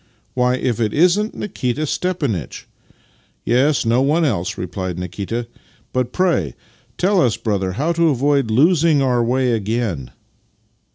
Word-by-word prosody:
Why, 125 0 +2
if 125 -2 -1
it 110 -2 0
isn't 180 +7 +2
Nikita 150 - -2
Stepanitch! 140 - -3 0.3
" - - -35
" - - -41
Yes, 130 +4 +2
no 115 +3 +3
one 155 +5 +2
else," 95 - -1
replied 90 0 -4
Nikita. 100 +6 -4 0.2
" - - -34
But 125 -1 -1
pray 165 - 0 0.4
tell 190 0 +2
us, 115 -5 +2
brother, 95 -5 -1
how 150 - 0
to 170 -1 +2
avoid 140 -2 +1
losing 155 +4 +3
our 125 -2 +2
way 125 +1 +1
again." 110 - -2
125 Hz, 150 wpm, -19 LUFS, 110-155 Hz, 0.4 s, no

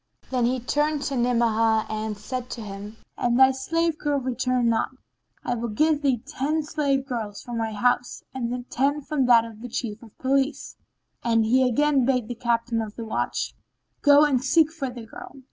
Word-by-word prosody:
Then 250 -2 +2
he 255 +1 0
turned 295 +4 0
to 280 0 -2
Ni'amah 230 -2 +2
and 215 -1 -3
said 250 +4 -5
to 235 - -6
him, 205 +1 -8 0.2
"And 240 0 +2
thy 265 0 +8
slave 325 +5 -1
girl 290 -1 0
return 255 -1 0
not, 230 -1 +1 0.6
I 245 - 0
will 235 0 -3
give 300 +6 +2
thee 260 -5 +1
ten 305 +4 -1
slave 285 -3 0
girls 225 -6 -5
from 240 -1 -4
my 225 -1 -2
house 245 +3 0
and 245 -1 -3
ten 285 +4 +1
from 275 -2 0
that 230 -2 +6
of 225 -1 -11
the 245 - -7
Chief 225 -2 -4
of 225 -3 -16
Police." 270 +2 0 0.5
And 225 -1 +2
he 250 +4 +3
again 285 +2 +3
bade 250 -3 +1
the 245 - -4
Captain 235 0 0
of 215 -1 -6
the 230 - -6
Watch, 220 - -2 0.5
"Go 290 0 +7
and 260 -4 +1
seek 310 +3 +4
for 295 -5 -4
the 240 -2 -9
girl." 225 - -11
245 Hz, 190 wpm, -25 LUFS, 230-275 Hz, 0.6 s, thy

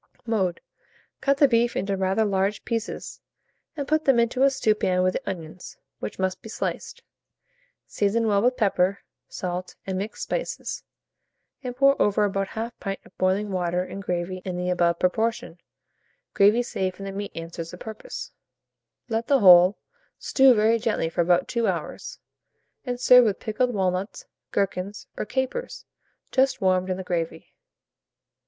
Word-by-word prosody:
Mode. 195 -7 0 0.6
Cut 275 0 +2
the 285 - +6
beef 235 -1 +2
into 195 +1 -1
rather 190 +3 +1
large 200 0 0
pieces, 230 -1 -4 0.6
and 285 -1 -3
put 310 +1 +1
them 270 -3 +4
into 235 +2 +1
a 275 - +6
stewpan 210 -8 +1
with 185 0 +2
the 265 - -4
onions, 170 -1 -8 0.2
which - - -6
must 185 0 -2
be 220 - -10
sliced. - - -4 0.8
Season 215 +3 0
well 205 -2 +3
with 250 +3 +2
pepper, 195 -2 +1 0.3
salt, 180 -1 -5
and 190 -1 -2
mixed 210 +3 -5
spices, - - -4 0.8
and 250 -1 -5
pour 275 +1 +4
over 205 0 +3
about 195 -1 -1
1/2 225 +3 -4
pint 195 -1 -4
of - - -19
boiling 195 +3 +1
water, 180 -1 0
and 195 +1 -7
gravy 180 0 -3
in 180 -2 -4
the 180 0 -1
above 170 -1 +2
proportion 200 -1 -1 0.7
(gravy 210 +5 +4
saved 190 -5 -3
from 195 - -8
the 195 - -4
meat 200 +1 -5
answers 165 0 -6
the 180 - -9
purpose); 220 +3 -8 0.8
let 225 0 -2
the 280 - +5
whole 185 -2 +7 0.4
stew 265 -2 +5
very 220 +2 +3
gently 220 -7 0
for 170 - 0
about 175 +1 +2
2 235 -2 0
hours, - - -4 0.7
and 245 -1 -3
serve 250 0 +7
with 205 -3 0
pickled 245 +2 0
walnuts, 190 -1 -2 0.3
gherkins, 195 0 -2
or - - -3
capers, 260 - -3 0.5
just 265 0 +2
warmed 185 -1 +1
in 185 - -1
the 190 - -5
gravy. 170 -2 -4
200 Hz, 160 wpm, -25 LUFS, 185-230 Hz, 0.8 s, whole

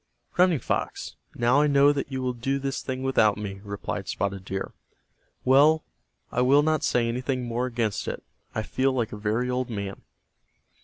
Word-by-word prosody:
"Running 180 -2 +4
Fox, - - -3 0.2
now 120 +4 +3
I 150 - +4
know 140 0 +5
that 140 -1 -3
you 130 -1 -3
will 125 -1 0
do 135 +3 -1
this 135 0 -3
thing 130 0 -4
without 110 -6 +3
me," 100 -2 -6
replied 100 -1 -5
Spotted 100 -1 -2
Deer. 95 0 -4 0.7
"Well, 150 +4 +5 0.5
I - - +1
will 140 +4 +5
not 155 -1 +1
say 120 -1 +2
anything 125 +2 -2
more 120 +2 -1
against 115 -4 -2
it. - - -4 0.3
I 110 - -1
feel 130 +4 +1
like 120 -3 -1
a - - -5
very 105 +4 -1
old 125 0 -1
man." 100 -3 -5
125 Hz, 175 wpm, -26 LUFS, 110-135 Hz, 0.7 s, know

